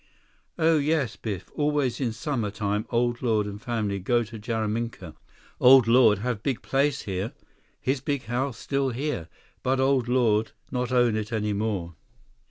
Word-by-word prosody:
"Oh 160 -1 +4
yes, 145 -5 0
Biff, 100 -5 -6
always 145 -4 0
in 120 -3 0
summer 120 -4 -2
time 105 +1 -2
Old 120 0 0
Lord 110 -4 +1
and 105 0 -7
family 105 -5 -2
go 120 +5 +1
to 115 0 -9
Jaraminka. 110 -5 -3 0.5
Old 130 -2 +7
Lord 115 -3 +6
have 120 -4 -1
big 130 -1 -2
place 140 0 +1
here. 95 +3 -3 0.5
His 130 0 -1
big 140 -1 -2
house 125 +1 -2
still 135 -1 -1
here, 125 - -3 0.3
but 130 +1 +1
Old 130 -2 +2
Lord 115 -3 +2 0.2
not 125 0 -2
own 120 -3 +3
it 110 0 -3
any 105 -2 -1
more." 100 -5 -2
120 Hz, 160 wpm, -26 LUFS, 105-130 Hz, 0.5 s, Old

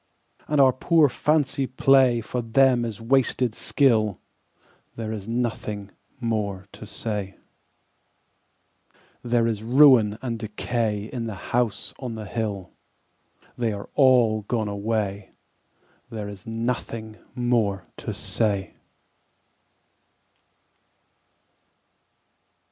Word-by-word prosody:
And 150 -1 +1
our 130 -2 +6
poor 155 +2 +3
fancy 140 0 +1
play 130 -1 +4
For 120 +3 -3
them 120 +1 +3
is 115 -2 -5
wasted 125 0 +1
skill: 110 - +2 0.8
There 110 -1 -4
is 105 -2 -6
nothing 110 -4 -3 0.3
more 105 -5 -2
to 110 - -11
say. 105 -3 -4 1.9
There 120 -1 +1
is 110 -3 -1
ruin 120 -3 +6
and 115 -3 -3
decay 110 -1 -2
In 120 -3 -3
the 100 -4 -8
House 120 -3 0
on 125 -4 -5
the 110 -1 -6
Hill 100 -3 -4 0.8
They 115 -3 -1
are 100 - -7
all 125 -5 +4
gone 115 -3 -1
away, 100 -1 -2 0.8
There 105 -2 -5
is 100 0 -11
nothing 115 -1 -4 0.2
more 115 -6 +1
to - - -5
say. 100 -4 -1
115 Hz, 100 wpm, -24 LUFS, 105-125 Hz, 1.9 s, our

